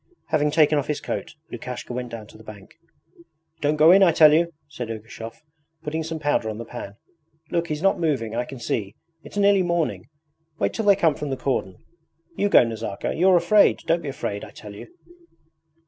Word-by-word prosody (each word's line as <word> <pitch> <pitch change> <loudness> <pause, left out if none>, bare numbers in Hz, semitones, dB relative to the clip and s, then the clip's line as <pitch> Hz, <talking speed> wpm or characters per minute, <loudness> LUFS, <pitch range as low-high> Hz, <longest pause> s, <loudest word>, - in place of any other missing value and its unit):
Having 150 -2 +2
taken 150 0 +3
off 140 - -4
his 150 - -2
coat, - - -5 0.2
Lukashka 125 0 -6
went 125 0 -4
down 115 -2 -8
to - - -17
the 110 - -14
bank. 105 -3 -12 0.9
'Don't 150 +1 +1
go 155 +2 +6
in, 195 +2 +7
I 185 -3 +6
tell 155 -1 +6
you!' 170 +2 +2 0.2
said 125 -5 -7
Ergushov, 115 +3 -8 0.4
putting 160 +2 -3
some 160 0 -4
powder 145 -7 0
on 110 - -5
the 115 - -7
pan. 110 -4 -8 0.6
'Look, 170 -1 0
he's 150 +1 -4
not 195 - +3
moving. 135 -9 -1
I 120 +1 -1
can 135 - -9
see. 105 -4 -3 0.3
It's - - -10
nearly 200 -1 +4
morning; 170 -3 -1 0.5
wait - - 0
till 220 - -3
they 200 -1 +6
come 170 -5 +2
from 145 0 -5
the 135 - -2
cordon. 120 -10 -2 0.6
You 205 - +1
go, - - +7
Nazarka. 110 -3 -4
You're 185 +1 +4
afraid! 175 +5 +4
Don't 170 +1 +1
be 150 - -5
afraid, 105 -6 -4
I - - -9
tell 105 -1 -11
you.' - - -10
150 Hz, 200 wpm, -23 LUFS, 115-170 Hz, 0.9 s, in